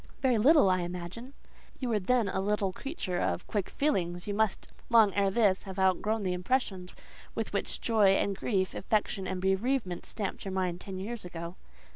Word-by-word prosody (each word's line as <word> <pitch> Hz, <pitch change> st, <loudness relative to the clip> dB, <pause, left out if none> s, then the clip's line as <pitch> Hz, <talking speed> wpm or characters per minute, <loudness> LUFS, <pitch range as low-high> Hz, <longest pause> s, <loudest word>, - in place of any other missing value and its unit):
"Very 250 Hz, -4 st, +3 dB
little, 290 Hz, +1 st, +6 dB
I 185 Hz, 0 st, +3 dB
imagine." 180 Hz, +9 st, -6 dB, 0.4 s
"You 255 Hz, -, -3 dB
were 220 Hz, -2 st, +2 dB
then 230 Hz, +3 st, +2 dB
a 190 Hz, 0 st, -1 dB
little 200 Hz, -1 st, 0 dB
creature 190 Hz, -, -4 dB
of 85 Hz, -, -1 dB
quick 205 Hz, -4 st, -2 dB
feelings: 175 Hz, -, -1 dB
you 205 Hz, -, -2 dB
must, 220 Hz, -1 st, 0 dB, 0.2 s
long 220 Hz, -4 st, +6 dB
ere 200 Hz, -1 st, +2 dB
this, 195 Hz, -2 st, +3 dB
have 190 Hz, -, -7 dB
outgrown 200 Hz, +3 st, +1 dB
the 185 Hz, -1 st, 0 dB
impressions 185 Hz, -1 st, -1 dB, 0.4 s
with -, -, -3 dB
which -, -, -2 dB
joy 210 Hz, -4 st, +4 dB
and 200 Hz, 0 st, 0 dB
grief, 190 Hz, -2 st, -1 dB
affection 200 Hz, -2 st, -1 dB
and 185 Hz, 0 st, -3 dB
bereavement, 190 Hz, 0 st, 0 dB
stamped 205 Hz, -3 st, -4 dB
your 195 Hz, -, -4 dB
mind 180 Hz, -2 st, -1 dB
ten 190 Hz, -2 st, -6 dB
years 220 Hz, +4 st, -5 dB
ago." 170 Hz, 0 st, -7 dB
195 Hz, 180 wpm, -30 LUFS, 185-225 Hz, 0.4 s, little